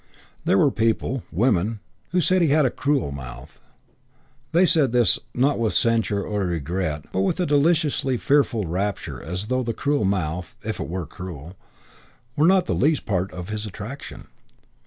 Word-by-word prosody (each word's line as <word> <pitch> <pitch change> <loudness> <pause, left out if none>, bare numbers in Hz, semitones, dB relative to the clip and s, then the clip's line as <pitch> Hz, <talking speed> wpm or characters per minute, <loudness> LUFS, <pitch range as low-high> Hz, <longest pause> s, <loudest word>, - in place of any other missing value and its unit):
There - - +3
were 140 - +4
people 115 +3 0
women 105 +1 +1 0.3
who 180 - +1
said 185 +2 +3
he 170 - +4
had 150 0 +4
a 125 - +2
cruel 140 - 0
mouth. 60 -3 -9 0.9
They 175 +3 +5
said 155 -8 +3
this, 120 -2 +4 0.2
not 135 +2 +2
with 115 -2 +1
censure 115 -3 +2
or 105 0 -2
regret, 85 -2 -2
but 95 - -1
with 95 - 0
a 180 - +2
deliciously 145 -3 +2
fearful 135 -6 +2
rapture 95 +4 -3
as 90 +5 -4
though 130 +3 0
the 115 -2 -3
cruel 145 -4 0
mouth 90 -3 -2
(if - - -4
it - - -3
were 90 0 -3
cruel) 85 0 -9 0.8
were 150 +3 +4
not 185 -1 +4
the - - -1
least 150 +1 +1
part 95 -2 -1
of 90 +1 -7
his 105 0 -3
attraction. 110 +7 -8
110 Hz, 170 wpm, -23 LUFS, 90-140 Hz, 0.9 s, They